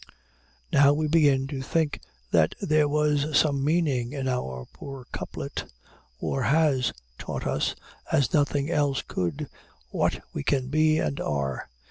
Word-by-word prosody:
Now 140 Hz, 0 st, +6 dB
we 155 Hz, +1 st, 0 dB
begin 145 Hz, -4 st, +4 dB
to 140 Hz, -2 st, -4 dB
think 155 Hz, +3 st, 0 dB, 0.3 s
that 80 Hz, -2 st, +3 dB
there 155 Hz, -5 st, +3 dB
was 150 Hz, 0 st, +2 dB
some 140 Hz, -3 st, +2 dB
meaning 145 Hz, -6 st, +1 dB
in 135 Hz, -2 st, -3 dB
our 65 Hz, -, -2 dB
poor 135 Hz, -3 st, -9 dB
couplet. -, -, -5 dB, 0.5 s
War 135 Hz, -, -1 dB
has 140 Hz, -2 st, +3 dB, 0.3 s
taught -, -, -5 dB
us, -, -, 0 dB, 0.4 s
as 135 Hz, -4 st, +2 dB
nothing 145 Hz, 0 st, +1 dB
else 145 Hz, -4 st, +1 dB
could, 85 Hz, -5 st, -3 dB, 0.4 s
what -, -, 0 dB
we -, -, -3 dB
can 130 Hz, -2 st, 0 dB
be 155 Hz, +1 st, +3 dB
and 145 Hz, -, -1 dB
are. 70 Hz, -3 st, -2 dB
140 Hz, 140 wpm, -26 LUFS, 130-150 Hz, 0.5 s, Now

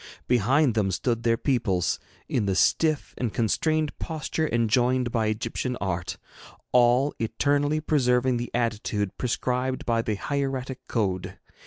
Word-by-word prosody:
Behind 125 Hz, +3 st, +3 dB
them 105 Hz, -3 st, +1 dB
stood 115 Hz, +5 st, -1 dB
their 115 Hz, -1 st, +2 dB
peoples, 110 Hz, -, 0 dB, 0.3 s
in 110 Hz, -5 st, 0 dB
the 95 Hz, -, +1 dB
stiff 155 Hz, -, +2 dB
and 120 Hz, -3 st, -1 dB
constrained 155 Hz, +8 st, 0 dB
posture 160 Hz, -1 st, -2 dB
enjoined 120 Hz, +2 st, +2 dB
by 115 Hz, -2 st, +1 dB
Egyptian 115 Hz, +3 st, -2 dB
art, 90 Hz, -3 st, -3 dB, 0.5 s
all 125 Hz, +3 st, +4 dB
eternally 145 Hz, +6 st, +1 dB
preserving 125 Hz, -4 st, +2 dB
the 120 Hz, 0 st, -4 dB
attitude 105 Hz, -4 st, -1 dB
prescribed 125 Hz, +1 st, -1 dB
by 115 Hz, -1 st, +2 dB
the 110 Hz, -2 st, -2 dB
hieratic 135 Hz, +2 st, -3 dB
code. 95 Hz, -6 st, -2 dB
120 Hz, 130 wpm, -26 LUFS, 110-135 Hz, 0.5 s, all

